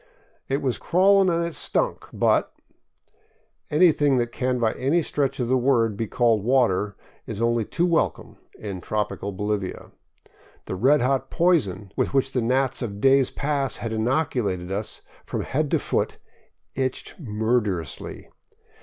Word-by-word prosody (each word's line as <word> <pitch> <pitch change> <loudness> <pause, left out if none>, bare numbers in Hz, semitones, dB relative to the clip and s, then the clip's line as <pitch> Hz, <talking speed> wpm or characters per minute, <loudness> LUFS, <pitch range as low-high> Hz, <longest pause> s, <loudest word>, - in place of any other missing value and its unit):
" - - -39
It 140 - 0
was 130 -3 0
crawlin' 190 +2 +4
an' 170 0 +1
it 170 0 -3
stunk, - - -1
but - - +1 0.4
" - - -38
— - - -40 0.3
anything 150 -4 +4
that 120 -1 0
can 125 +1 -1
by 115 -2 +1
any 155 +6 +1
stretch 140 -2 -1
of 120 - 0
the 130 +1 +2
word 120 -4 +2
be 115 +2 -3
called 115 -3 +2
water 105 -5 +2 0.3
is - - -5
only 115 -1 +1
too 175 - 0
welcome 170 -2 -1 0.2
in 100 -4 -6
tropical 100 0 -3
Bolivia. 100 -1 -3 0.7
The - - -5
red 130 +9 +3
hot 135 +1 0
poison 110 - +1
with - - -1
which 135 0 +2
the 125 - 0
gnats 130 +3 +1
of 100 -4 -4
days 135 +1 +4
past 140 -2 -2
had 115 -1 -4
inoculated 110 - -1
us 105 +2 -4 0.2
from - - -4
head 150 +1 -1
to - - +3
foot - - -1 0.6
itched 130 +5 -3
murderously. 105 - -2
125 Hz, 155 wpm, -24 LUFS, 105-140 Hz, 0.7 s, crawlin